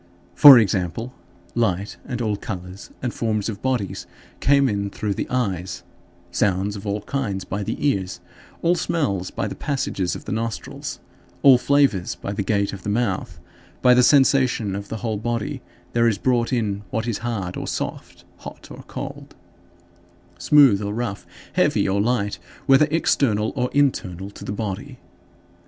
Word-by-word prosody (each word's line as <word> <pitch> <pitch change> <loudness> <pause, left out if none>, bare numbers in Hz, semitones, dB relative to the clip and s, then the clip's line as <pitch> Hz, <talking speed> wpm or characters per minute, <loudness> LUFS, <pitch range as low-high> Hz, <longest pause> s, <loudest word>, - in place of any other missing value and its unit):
For 135 +8 +10
example, 105 +3 0 0.4
light 100 -3 -1
and 125 -3 -3
all 105 -2 0
colors 95 -2 -7
and 125 - -2
forms 110 -2 -1
of 100 -2 -6
bodies 125 -7 -2 0.3
came 140 0 +4
in 100 -3 -1
through 105 +1 -3
the - - -3
eyes; 95 -8 -2 0.5
sounds 100 +1 0
of 100 +1 -7
all 100 +1 -1
kinds 105 -6 -3
by 100 +2 -4
the 100 - -3
ears; 95 -9 -1 0.4
all 170 - +4
smells 145 - -1
by - - -3
the - - -5
passages 110 -10 -2
of - - -9
the - - -5
nostrils; 115 +1 -4 0.5
all 130 -3 +8
flavors 140 -10 +2
by 100 - -5
the 100 - -2
gate 100 0 0
of 100 - -7
the 105 - -4
mouth; 105 -3 -1 0.4
by 125 - +7
the 125 - +5
sensation 130 -6 +3
of 100 0 -6
the 110 - -5
whole 110 -2 -1
body, 115 0 -3 0.3
there 115 0 +3
is 110 -3 +1
brought 120 -2 +1
in 105 -5 -1
what 110 +3 -2
is 115 -4 -2
hard 105 -6 -3
or - - -5
soft, - - -5
hot - - -11
or - - -9
cold, - - -7 1.0
smooth 135 -9 +5
or 105 0 -3
rough, 115 -4 -4 0.3
heavy - - +2
or 100 +1 +1
light, 105 -5 0 0.3
whether 135 +2 +5
external 115 -9 +1
or 125 -2 0
internal 100 -10 0
to - - -11
the - - -4
body. 110 +6 -5
110 Hz, 165 wpm, -22 LUFS, 100-125 Hz, 1.0 s, For